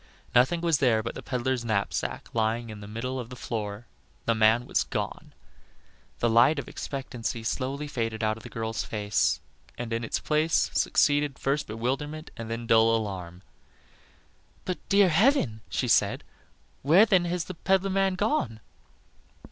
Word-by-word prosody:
Nothing 130 +8 +4
was 165 -4 +2
there 115 -5 +3
but 115 - -4
the - - -7
peddler's 125 -1 -1
knapsack 110 -3 -2
lying 115 +1 0
in 105 - -9
the 100 - -9
middle 125 +5 -4
of 120 -2 -6
the 125 - -8
floor 105 -2 -5 0.4
the 115 - +3
man 110 +2 +4
was - - 0
gone. - - -4 0.9
The 120 - +1
light 120 +7 +5
of 140 - -4
expectancy 125 -4 -5
slowly 135 +5 -2
faded 115 -5 -3
Out 110 0 +1
of 110 - -12
the - - -10
girl's 110 -1 -3
face, 105 -2 0 0.4
and 120 -1 -4
in 115 +1 -1
its 115 - -1
place 155 +1 +1
succeeded 145 -2 +2
first 145 +2 -1
bewilderment 135 +8 -3
and 115 -2 -7
then 115 +1 -4
dull 115 0 +5
alarm. 95 -5 -5 1.2
"But, 180 -3 -3
dear 200 -1 +5
heaven," 160 - +3
she - - -1
said, - - +2 0.6
"where 170 +10 +6
then 190 -5 +3
has 175 0 -1
the 185 - -7
peddler 190 +2 +1
man 195 -1 +2
gone?" 185 - 0
120 Hz, 160 wpm, -27 LUFS, 110-150 Hz, 1.2 s, where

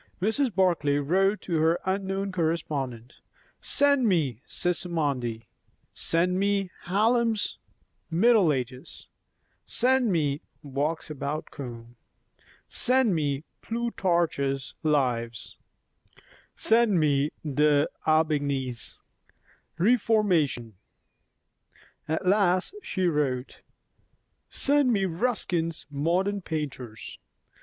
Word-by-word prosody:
Mrs. 225 +5 0
Barclay 170 -7 +2
wrote 190 +8 +1
to 170 -3 -2
her 165 +2 +2
unknown 195 +1 -1
correspondent, 150 -8 -3 0.4
"Send 280 -4 +3
me 145 - +1
'Sismondi';" 145 -10 -2 0.5
"send 180 +3 +1
me 200 -2 0
Hallam's 225 +3 +1 0.5
'Middle 195 0 +4
Ages';" 130 -1 -5 0.6
"send 250 -2 +2
me 150 -4 0 0.2
'Walks 145 +3 -2
about 150 +1 -4
Kome';" 120 -3 -9 0.7
"send 255 -4 +3
me 145 -3 -1 0.2
'Plutarch's 170 - -1
Lives';" 125 -7 -1 1.0
"send 225 -5 +4
me 145 -1 +2 0.2
D'Aubigné's 145 -3 0 0.8
'Réformation';" 190 - +2 1.4
at 160 +4 -2
last 185 - +2
she 185 - -2
wrote, 145 -6 -1 0.9
"Send 285 -2 +2
me 200 -4 +1
Ruskin's 175 -4 -1
'Modern 180 +8 0
Painters'." 135 -9 -6
165 Hz, 80 wpm, -27 LUFS, 140-200 Hz, 1.4 s, Middle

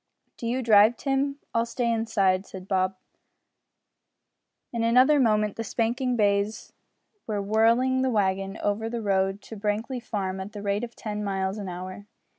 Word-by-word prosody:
"Do 230 - -5
you 255 +2 -1
drive, 220 +1 +6
Tim; 275 0 0 0.2
I'll 230 0 +1
stay 235 0 -1
inside," 200 -4 +1
said 190 -1 -9
Bob. 190 -1 +1 1.8
In 235 - -1
another 255 +6 +5
moment 215 -4 +2
the 225 - -2
spanking 245 +3 -1
bays 205 -1 0 0.5
were 210 -2 -1
whirling 230 +5 +3
the 260 - +1
wagon 195 -3 0
over 210 +2 0
the 235 -1 -4
road 195 0 0
to 225 - -9
Brankly 215 +5 -2
Farm 195 -5 -3
at 195 +3 -7
the 205 -1 -7
rate 200 +2 0
of 240 -1 -6
ten 210 -2 -4
miles 195 0 -2
an 195 -2 -5
hour. 185 +3 -7
215 Hz, 160 wpm, -26 LUFS, 195-235 Hz, 1.8 s, drive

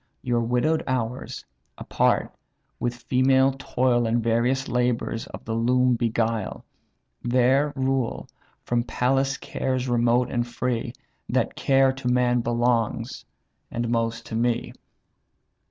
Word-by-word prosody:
Your 120 -1 +1
widow'd 125 +7 +1
hours, 125 -1 -3 0.3
apart, - - +1 0.5
with 120 0 -1
female 130 +1 +3
toil 125 -3 +1
And 115 +1 +1
various 120 +4 +1
labours 120 -2 -1
of - - -10
the 110 - -3
loom 125 +2 +3
beguile; 115 -2 -1 0.6
There 130 +4 +3
rule, 130 -2 -1 0.4
from 120 -1 +1
palace 135 +3 0
cares 130 -2 -2
remote 120 0 +2
and 120 0 -1
free; 120 -1 -2 0.4
That - - 0
care 135 -1 +3
to 135 -1 -6
man 125 0 +3
belongs, 120 0 0 0.4
and 120 0 -3
most 115 0 -1
to 110 - -6
me." 120 +1 0
120 Hz, 120 wpm, -25 LUFS, 115-130 Hz, 0.6 s, female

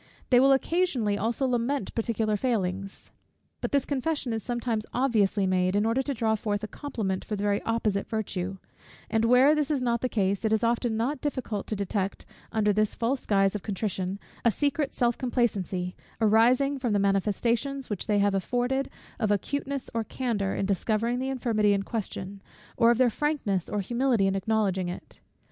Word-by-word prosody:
They 245 - +7
will 270 +2 +6
occasionally 270 - +1
also 230 +6 -1
lament 250 -1 -1
particular 225 -2 0
failings: 195 -5 -2 0.5
but - - -2
this 280 -1 +2
confession 280 -2 -1
is 220 - -2
sometimes 235 -2 -2
obviously 215 -6 +2
made, 185 0 +1
in 205 +1 +2
order 230 +4 +2
to 280 +1 -2
draw 225 -1 +1
forth 210 -1 -2
a - - -2
compliment 210 -9 -3
for 210 - -3
the 205 - -4
very 205 0 +1
opposite 215 -3 0
virtue: 195 -4 -3 0.5
and 225 0 +2
where 250 +5 +6
this 300 -1 0
is 295 -3 +1
not 235 -2 0
the 255 - 0
case, 200 -2 0
it 220 - +1
is 220 +1 +2
often 235 -1 +1
not 260 +4 -1
difficult 255 -8 -3
to 215 - -2
detect, 200 -1 -2 0.3
under 210 -2 +2
this 215 +1 +1
false 250 +3 -1
guise 195 -2 +3
of 210 - -3
contrition, 195 -2 -3 0.3
a 235 - +5
secret 285 +4 0
self 240 -1 0
complacency, 200 -8 -1 0.2
arising 245 +6 +4
from 245 -4 0
the - - +3
manifestations 225 +7 0
which 205 - -3
they 210 - +2
have 200 0 +3
afforded 245 +7 0 0.3
of 215 -3 +1
their 205 - +4
acuteness 280 +4 -3
or 230 -1 0
candour 220 -5 -2
in - - -1
discovering 220 +5 0
the 265 +1 -2
infirmity 225 -6 +2
in 200 0 0
question, 200 -3 -5 0.3
or 230 - +5
of 235 - +4
their 250 -2 +4
frankness 230 - -1
or 205 - -1
humility 240 0 +1
in 195 - +2
acknowledging 195 -2 0
it. 180 - -9
225 Hz, 185 wpm, -27 LUFS, 200-250 Hz, 0.5 s, They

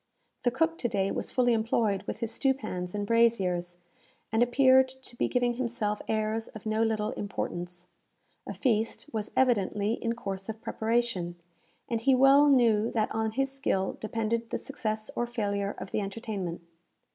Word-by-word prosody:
The 245 - +3
cook 325 +7 0
to 240 - 0
day 195 -3 0
was - - -3
fully 245 -2 +3
employed 220 -3 +1
with - - -5
his 230 -1 -1
stewpans 215 -9 -1
and 205 0 -1
braziers, 190 -7 +2 0.5
and 220 +1 +2
appeared 260 +1 +5
to 260 -2 -13
be - - +1
giving 245 -1 +1
himself 230 -4 -1
airs 220 +1 -1
of 220 - -11
no 215 0 0
little 220 -1 +1
importance. 175 -3 -5 0.6
A - - -4
feast 225 -4 0
was 215 -2 -2
evidently 210 -4 +2
in 230 0 +1
course 195 -3 -5
of 220 0 -5
preparation, 225 -7 -1 0.5
and 230 -1 -1
he 265 +2 +4
well 275 +3 +6
knew 230 -5 +4
that 220 -2 0
on 220 0 -1
his 270 +2 0
skill 195 -9 -1
depended 225 +1 -2
the - - -1
success 215 -6 -4
or 240 - -1
failure 200 -4 -2
of - - -7
the - - 0
entertainment. 195 -4 -4
225 Hz, 165 wpm, -29 LUFS, 205-240 Hz, 0.6 s, well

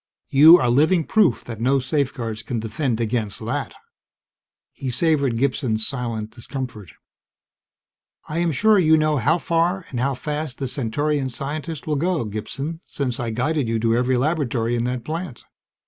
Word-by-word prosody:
You 155 +5 +9
are 125 - +1
living 160 +7 +3
proof 210 +1 +2
that 115 -2 -8
no 135 +3 +3
safeguards 130 -5 -2
can 120 -3 -3
defend 115 +2 -2
against 110 -3 -1
that." 135 +5 -3 1.0
He 135 - -5
savored 140 -2 +2
Gibson's 120 -4 0
silent 115 -5 -3
discomfort. 120 - -7 1.3
"I 155 +2 -2
am 170 -1 +1
sure 215 +7 +4
you 160 -2 +5
know 155 -1 +2
how 145 +7 +2
far 170 +2 0
and 125 - -3
how 135 +2 0
fast 150 0 -4
the 135 - -3
Centaurian 140 +3 -1
scientists 145 +4 -5
will 150 -2 0
go, 170 -3 0
Gibson, 135 +10 -5
since 130 -4 -3
I 120 -2 -2
guided 125 +4 -1
you 115 - +1
to 115 +1 +1
every 125 +1 +2
laboratory 125 -5 0
in 120 0 -1
that 125 -1 -3
plant. 160 -5 -5
135 Hz, 160 wpm, -22 LUFS, 120-155 Hz, 1.3 s, You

